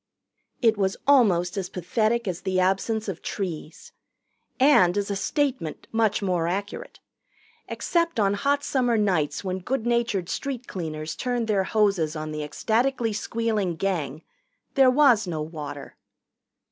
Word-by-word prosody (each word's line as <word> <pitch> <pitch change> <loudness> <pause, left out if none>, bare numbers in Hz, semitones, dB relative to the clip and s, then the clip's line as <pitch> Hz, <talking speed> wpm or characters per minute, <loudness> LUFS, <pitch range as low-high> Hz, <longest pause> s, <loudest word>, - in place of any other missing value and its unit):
It 225 -3 +4
was 190 -1 0
almost 200 -9 +4
as 190 -2 -3
pathetic 220 +5 0
as 180 0 -3
the 185 -1 0
absence 195 +4 0
of 190 -4 -5
trees. 170 -5 -5 0.7
And, 205 -10 +5
as 205 0 -1
a - - -1
statement, 260 - -2
much 220 -2 +1
more 180 -3 0
accurate. 200 +4 -4 0.7
Except 335 -5 -1
on 200 -1 +3
hot 280 +7 0
summer 245 -4 +1
nights 185 -8 0
when 185 -1 -2
good 240 +5 -2
natured 235 -7 0
street 255 +4 -4
cleaners 155 -5 -5
turned 245 -2 -2
their 200 -3 +1
hoses 195 -8 +1
on 155 0 -4
the 155 0 -4
ecstatically 225 - 0
squealing 215 -4 -1
Gang, 160 -6 -2 0.5
there 270 -2 +6
was 255 -6 +4
no 160 -3 -2
water. 150 -3 -8
200 Hz, 140 wpm, -25 LUFS, 175-235 Hz, 0.7 s, there